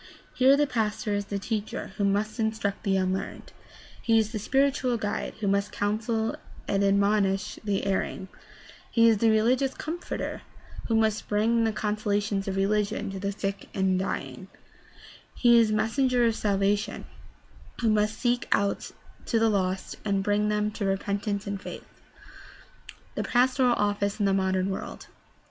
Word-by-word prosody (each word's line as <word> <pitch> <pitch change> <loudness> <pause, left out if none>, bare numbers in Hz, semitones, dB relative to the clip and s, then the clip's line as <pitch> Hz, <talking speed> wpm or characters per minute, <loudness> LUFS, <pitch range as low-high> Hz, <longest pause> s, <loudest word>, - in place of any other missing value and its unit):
Here 265 +2 +5
the 295 - +3
pastor 215 -4 -1
is 205 0 -1
the 200 0 -3
teacher 210 0 -4
who 205 - 0
must 205 +3 0
instruct 220 -2 -1
the 195 -2 +1
unlearned; 185 0 -3 0.5
he 230 -1 +3
is 220 -1 +1
the 220 - -3
spiritual 265 +1 +1
guide 210 -2 -3
who 205 - 0
must 200 +1 +1
counsel 220 +2 -1 0.3
and 195 0 +1
admonish 200 0 +2
the 200 -2 -1
erring; 190 -1 -2 0.6
he 230 -1 +4
is 225 -3 +4
the 230 - +4
religious 250 +5 +2
comforter 335 +3 -5 0.5
who 225 - +1
must 220 -1 +1
bring 225 +2 +2
the 225 - +1
con 210 0 -2
solations 205 -1 -1
of 195 - -2
religion 205 +1 0
to 195 - -6
the 200 +1 -2
sick 200 0 -4
and 190 -1 +2
the - - 0
dying; - - -5 0.9
he 235 -1 +6
is 230 - +4
the 215 - +1
mes 220 +1 0
senger 255 -3 +3
of 225 - +1
salvation 200 0 0 0.8
who 230 - +3
must 215 +1 +1
seek 245 0 0
out 200 0 +1 0.4
the 225 -1 +3
lost 190 -2 -1
and 200 -2 0
bring 210 +1 +1
them 210 0 0
to 210 - -5
repentance 200 +1 -1
and 200 -1 -4
faith. - - -8 1.3
The - - -2
pastoral 250 0 +3
office 205 -1 0
in 205 - +2
the 195 - +3
modem 190 0 +1
world. 190 - -6
210 Hz, 160 wpm, -27 LUFS, 200-225 Hz, 1.3 s, he